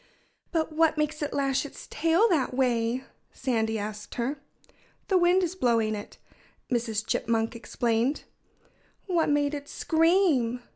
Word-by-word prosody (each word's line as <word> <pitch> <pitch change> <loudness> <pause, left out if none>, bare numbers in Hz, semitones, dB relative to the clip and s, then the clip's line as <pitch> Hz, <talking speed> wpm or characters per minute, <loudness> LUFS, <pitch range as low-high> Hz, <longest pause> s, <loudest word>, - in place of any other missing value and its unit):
"But 320 -2 0
what 320 0 +3
makes 300 0 -1
it 295 - -2
lash 275 -2 0
its 285 - -9
tail 330 +8 +3
that 280 -8 +1
way?" 245 -1 +1 0.3
Sandy 220 -3 -1
asked 210 0 -6
her. 270 +4 -2 0.7
"The 380 - +4
wind 355 +2 +4
is 350 0 -1
blowing 230 -9 +1
it," 205 -1 -7 0.5
Mrs. 225 -3 -1
Chipmunk 225 +1 0
explained. 235 +3 -1 0.8
"What 345 -5 +1
made 290 0 +2
it 285 -1 -6
scream?" 320 -8 +2
270 Hz, 135 wpm, -27 LUFS, 230-320 Hz, 0.8 s, The